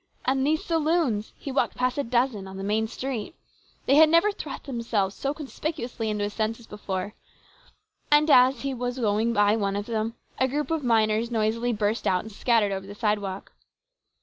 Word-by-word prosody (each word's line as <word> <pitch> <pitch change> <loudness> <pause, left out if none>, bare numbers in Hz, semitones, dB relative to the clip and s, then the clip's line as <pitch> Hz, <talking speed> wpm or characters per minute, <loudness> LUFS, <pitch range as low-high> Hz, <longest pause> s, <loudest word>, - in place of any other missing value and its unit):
And 265 +1 +1
these 310 +1 0
saloons! 315 -9 +1
He 280 - -6
walked 265 - 0
past 255 +2 0
a - - +1
dozen 235 -5 0
on 190 0 -9
the 195 - -5
main 215 +2 0
street. 260 +4 -5 0.5
They 285 +4 +7
never 335 +6 +4
had 410 - -6
thrust - - -6
themselves 230 -7 -1
so 275 - -2
conspicuously 285 -6 -4
into 210 -1 -1
his 205 0 -3
senses 225 +2 -2
before. 205 -2 -5 1.0
And 295 +1 +5
as 255 -1 +6
he 275 -1 -2
was 245 0 -3
going 220 -1 +1
by 205 -1 +3
one 200 -3 -1
of 205 0 -3
them, 225 0 -2 0.2
a 260 +1 +2
crowd 290 +2 -2
of 320 -3 -1
miners 225 -1 +2
noisily 230 +1 0
burst 210 0 -1
out 180 -1 +2
and 220 - -10
scattered 215 -1 +2
over 195 0 -4
the 205 - -9
sidewalk. 205 -3 -2
230 Hz, 185 wpm, -26 LUFS, 210-270 Hz, 1.0 s, They